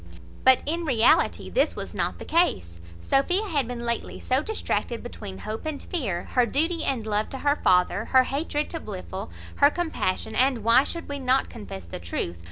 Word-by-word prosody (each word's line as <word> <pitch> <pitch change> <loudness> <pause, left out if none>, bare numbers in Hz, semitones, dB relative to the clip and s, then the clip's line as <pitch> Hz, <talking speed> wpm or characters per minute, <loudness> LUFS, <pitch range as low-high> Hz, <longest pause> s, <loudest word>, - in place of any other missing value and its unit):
But 260 -1 +6
in 335 +3 -1
reality 245 -7 +3
this - - +2
was - - -5
not - - -2
the - - -9
case. 85 - +1 0.2
Sophia 355 - +2
had 285 - 0
been 245 -1 -5
lately 235 -1 -2
so 260 +2 +1
distracted 305 - -2
between 205 -5 -8
hope 215 +2 -6
and 310 -2 -3
fear, 215 - -3
her 250 -2 +3
duty 325 +7 0
and 245 -5 -1
love 210 0 0
to 270 - -6
her 285 +2 +1
father, 180 +3 +2
her 260 -1 +5
hatred 295 +2 -2
to 330 - -4
Blifil, 190 - -7 0.3
her 285 - +6
compassion, 310 - -2
and 255 -3 +2
(why 230 +4 +6
should 335 - -6
we 285 0 -4
not 260 0 +1
confess 150 - -8
the 85 - -7
truth?) 85 0 -4
255 Hz, 185 wpm, -25 LUFS, 215-295 Hz, 0.3 s, But